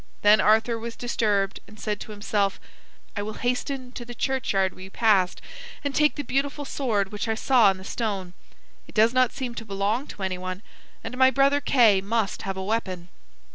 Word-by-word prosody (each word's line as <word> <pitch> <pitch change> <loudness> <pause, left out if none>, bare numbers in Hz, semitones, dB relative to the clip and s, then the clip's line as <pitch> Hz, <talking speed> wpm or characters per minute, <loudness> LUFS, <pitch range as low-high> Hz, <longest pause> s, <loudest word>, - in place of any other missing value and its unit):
Then 210 +1 +6
Arthur 225 +2 +3
was 230 0 -6
disturbed 205 -5 0
and 215 +1 -15
said 210 -1 -2
to - - -8
himself: 205 -1 -1 0.6
"I 205 - -2
will 210 +1 -5
hasten 250 +1 -2
to 250 - -7
the 240 0 -9
churchyard 215 -8 0
we 185 +1 -10
passed, 195 -4 +2 0.4
and 285 -1 -2
take 300 +1 +3
the 290 - -3
beautiful 280 +3 -1
sword 215 -9 -1
which 210 +2 -3
I 220 - 0
saw 240 -2 +4
in 190 - -1
the 190 - -11
stone. 195 -4 -3 0.5
It - - -16
does 225 +2 +4
not 255 -1 +3
seem 250 -2 -5
to 235 - -6
belong 210 +6 -1
to 200 - -8
anyone, 185 +1 -4 0.4
and 225 +2 -6
my 260 0 +7
brother 275 +2 +3
Kay 230 -8 +4
must 215 +1 -1
have 195 -1 -4
a 190 - -3
weapon." 190 -4 -3
220 Hz, 190 wpm, -25 LUFS, 195-250 Hz, 0.6 s, my